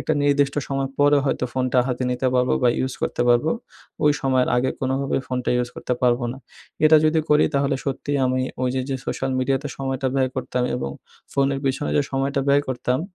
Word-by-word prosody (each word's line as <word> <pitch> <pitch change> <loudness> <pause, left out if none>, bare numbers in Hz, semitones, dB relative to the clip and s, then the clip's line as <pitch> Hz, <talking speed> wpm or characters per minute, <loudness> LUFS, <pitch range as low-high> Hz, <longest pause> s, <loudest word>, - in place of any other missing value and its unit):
একটা 155 - -1
নির্দিষ্ট 140 -1 +2
সময় 135 -1 -1
পরে 145 0 +5
হয়তো 135 - 0
ফোনটা 130 -1 +1
হাতে 125 0 -2
নিতে 125 +1 -1
পারবো 125 0 +2
বা 125 - +5
ইউস 130 0 -2
করতে - - 0
পারবো। 120 +6 +3 0.5
ওই 150 - +6
সময়ের 130 -2 +2
আগে 130 +1 +1
কোনভাবেই 135 +1 0
ফোনটা 125 -1 -1
ইউস 125 0 0
করতে - - -3
পারবো 120 0 +2
না। 130 - -10 0.5
এটা 155 +1 +7
যদি 155 +1 +3
করি 150 0 +5
তাহলে 140 0 +1
সত্যি 140 +1 -3
আমি 130 0 0 0.2
ওই 125 - +2
যে, 130 - 0
যে 135 - -1
সোশ্যাল 135 - -2
মিডিয়াতে 135 +2 0
সময়টা 135 -1 -2
ব্যয় 130 -1 +1
করতাম 125 -1 -2
এবং 70 - -3 0.4
ফোনের 140 0 +1
পেছনে 135 +2 -1
যে 145 - +4
সময়টা 135 +1 0
ব্যয় 145 +1 +4
করতাম। 125 +1 -1
135 Hz, 195 wpm, -22 LUFS, 125-140 Hz, 0.5 s, এটা